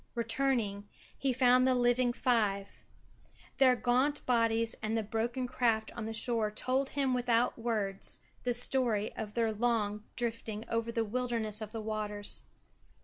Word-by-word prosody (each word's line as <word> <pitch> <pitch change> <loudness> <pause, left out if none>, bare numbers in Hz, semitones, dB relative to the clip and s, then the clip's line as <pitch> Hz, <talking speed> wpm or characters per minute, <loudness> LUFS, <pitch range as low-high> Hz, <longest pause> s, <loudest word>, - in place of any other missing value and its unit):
Returning 230 -4 0 0.3
he 275 - 0
found 255 0 +4
the 260 - +3
living 245 0 +3
five. 210 -6 0 0.7
Their 260 -2 +6
gaunt 255 +5 +1
bodies 230 -2 +2
and 220 +1 -1
the 220 - 0
broken 230 +4 -2
craft 230 -3 0
on 235 - -4
the - - -4
shore 230 -1 +2
told 255 +5 -1
him 275 -2 0
without 245 -1 +2
words 210 -4 -2 0.2
the 245 -1 0
story 240 -4 +2
of 210 -1 -6
their 230 -2 +1
long 215 -2 0
drifting 230 -2 -3
over 230 0 -1
the 230 -1 0
wilderness 225 -2 -2
of 215 -1 -6
the 225 - -5
waters. 210 - -4
230 Hz, 145 wpm, -32 LUFS, 215-250 Hz, 0.7 s, Their